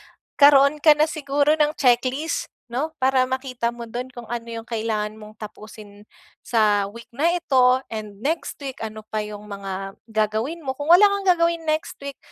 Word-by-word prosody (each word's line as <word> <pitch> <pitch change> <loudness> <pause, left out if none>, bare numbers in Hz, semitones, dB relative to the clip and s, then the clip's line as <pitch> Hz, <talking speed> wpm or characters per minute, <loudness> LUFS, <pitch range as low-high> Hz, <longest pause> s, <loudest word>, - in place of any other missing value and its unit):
magkaroon 285 +1 +4
ka 305 - +8
na 305 - +4
siguro 290 -1 +1
ng 300 0 +3
checklist 255 +4 +1 0.2
'no, 280 +7 -3
para 260 0 +3
makita 260 -2 -2
mo 235 -1 -8
do'n 250 +3 -5
kung 240 -1 -9
ano 235 -1 -4
'yong 230 -1 -6
kailangan 215 -2 -2
mong 215 0 -13
tapusin 210 -1 -11 0.4
sa 210 -3 +2
week 235 +3 -12
na 295 +7 +2
ito 260 -6 +3
and 210 -2 -7
next 325 +3 -2
week, 265 -2 -6
ano 220 -1 -6
pa 215 0 -2
'yong 210 -1 -8
mga 195 -1 -6
gagawin 220 +9 -1
mo, 265 - -1
kung 290 +2 -5
wala 355 +5 +8
kang 400 -1 -2
gagawin 335 -1 +2
next 310 +1 -2
week 280 -1 -7
250 Hz, 175 wpm, -23 LUFS, 215-290 Hz, 0.4 s, ka